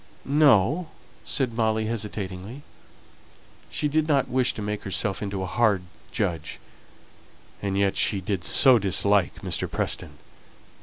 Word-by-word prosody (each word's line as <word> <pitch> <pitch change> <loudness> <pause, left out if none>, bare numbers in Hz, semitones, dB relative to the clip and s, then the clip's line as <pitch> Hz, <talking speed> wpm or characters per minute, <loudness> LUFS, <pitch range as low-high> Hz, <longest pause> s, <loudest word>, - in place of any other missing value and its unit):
"No," 145 - +4 0.4
said 130 -4 -1
Molly, 110 -1 0
hesitatingly. 105 +2 -5 1.1
She 150 - -1
did 155 +1 +1
not 140 -3 +2
wish 130 -1 +2
to 110 - -5
make 105 0 -3
herself 100 -1 -2
into 100 -2 -3
a - - -2
hard 100 -1 +1 0.3
judge, 85 -3 -3 1.0
and 100 -1 -2
yet 100 -1 +2
she 100 - +1
did 95 -1 -3
so 130 +3 +5
dislike 100 -1 +1
Mr. - - -2
Preston. - - -3
105 Hz, 130 wpm, -25 LUFS, 95-130 Hz, 1.1 s, so